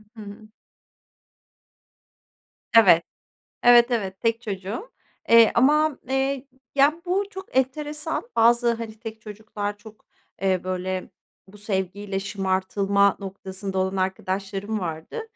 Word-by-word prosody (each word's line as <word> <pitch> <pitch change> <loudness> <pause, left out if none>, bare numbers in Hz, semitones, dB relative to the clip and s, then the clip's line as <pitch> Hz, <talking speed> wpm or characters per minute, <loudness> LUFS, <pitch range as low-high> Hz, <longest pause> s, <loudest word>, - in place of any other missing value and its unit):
Hı 220 - -10
hı. 210 +1 -11 2.3
Evet. 185 -8 +7 0.6
Evet, 240 0 +7
evet. 195 -5 -2
Tek 230 0 0
çocuğum. 205 - -5 0.4
Eee, 230 -1 +7
ama, 300 +3 +3
eee, 270 0 -1 0.3
ya, 285 +4 +3
bu 380 +3 +1
çok 380 -8 -10
enteresan. 300 - -1
Bazı, 235 +1 +4
hani, 225 -1 -8
tek 225 -1 -8
çocuklar 210 -1 -6
çok, 215 0 -15 0.4
eee, 190 -2 +2
böyle, 185 0 -3 0.4
bu 205 +2 -15
sevgiyle 195 -1 -3
şımartılma 195 0 +1
noktasında 190 0 -6
olan 190 +1 0
arkadaşlarım 195 +2 -2
vardı. 165 - -5
210 Hz, 110 wpm, -24 LUFS, 190-240 Hz, 2.3 s, Evet